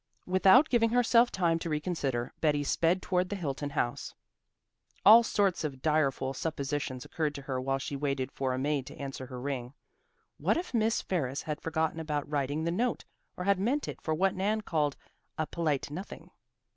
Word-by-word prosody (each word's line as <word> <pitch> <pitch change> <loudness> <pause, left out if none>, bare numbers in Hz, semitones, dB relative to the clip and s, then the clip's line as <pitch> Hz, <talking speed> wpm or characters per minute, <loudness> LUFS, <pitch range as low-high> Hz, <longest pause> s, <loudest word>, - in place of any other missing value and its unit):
Without 190 - +6
giving 230 -4 +3
herself 240 0 +4
time 170 -3 +1
to 165 - -4
reconsider, 150 -6 -2
Betty 145 -2 +2
sped 170 +5 +1
toward 180 0 0
the 205 - -2
Hilton 145 -5 -3
house. 120 -4 -2 0.9
All 225 +3 +10
sorts 200 -6 +1
of 135 -4 -5
direful 140 -4 +1
suppositions 140 -3 -3
occurred 155 -3 -2
to 140 - -7
her 130 -2 -3
while 135 +1 0
she 140 +1 -5
waited 135 -2 -2
for 135 -1 -2
a 130 - -1
maid 140 0 -1
to - - -10
answer 135 -2 -6
her 125 -1 -7
ring. 130 -1 -4 0.6
What - - +2
if 345 -5 -4
Miss 225 0 +1
Ferris 140 -7 -2
had 150 -1 -4
forgotten 160 0 -1
about 150 -2 -2
writing 145 +1 -1
the 170 - 0
note, 235 +7 -1 0.3
or 180 - -3
had 200 0 +2
meant 255 +9 0
it - - -7
for 160 - -1
what 190 +3 +2
Nan 210 +3 0
called 150 -7 -1 0.4
"a 155 - 0
polite 150 -4 -1
nothing"? 185 +7 -8
155 Hz, 185 wpm, -30 LUFS, 140-185 Hz, 0.9 s, All